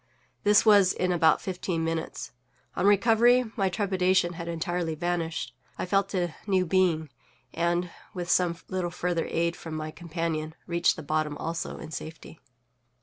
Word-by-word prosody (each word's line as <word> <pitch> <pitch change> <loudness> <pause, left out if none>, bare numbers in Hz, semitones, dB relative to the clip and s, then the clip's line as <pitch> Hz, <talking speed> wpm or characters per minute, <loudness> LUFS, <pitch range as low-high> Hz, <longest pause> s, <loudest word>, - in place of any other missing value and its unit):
This 205 +1 +5
was 200 -4 +6
in 180 0 0
about 165 -2 +4
fifteen 180 -3 -3
minutes. 165 0 -3 0.4
On 195 - +2
recovery, 230 +4 +5
my 195 -4 +1
trepidation 185 -2 +1
had 170 0 -7
entirely 170 0 -2
vanished; 165 -5 -2 0.2
I - - -2
felt 195 +1 +1
a 175 -3 0
new 190 -2 +2
being, 165 -4 +1 0.4
and, 175 +1 0 0.2
with 175 -2 -5
some 175 -1 +2
little 185 -2 -2
further 170 -1 -2
aid 170 +1 0
from 160 -2 -7
my 155 0 -4
companion, 160 -1 -3
reached 170 0 +2
the 160 - -8
bottom 150 0 -1
also 165 +1 -4
in 160 - -9
safety. 160 0 -8
175 Hz, 150 wpm, -27 LUFS, 165-185 Hz, 0.4 s, was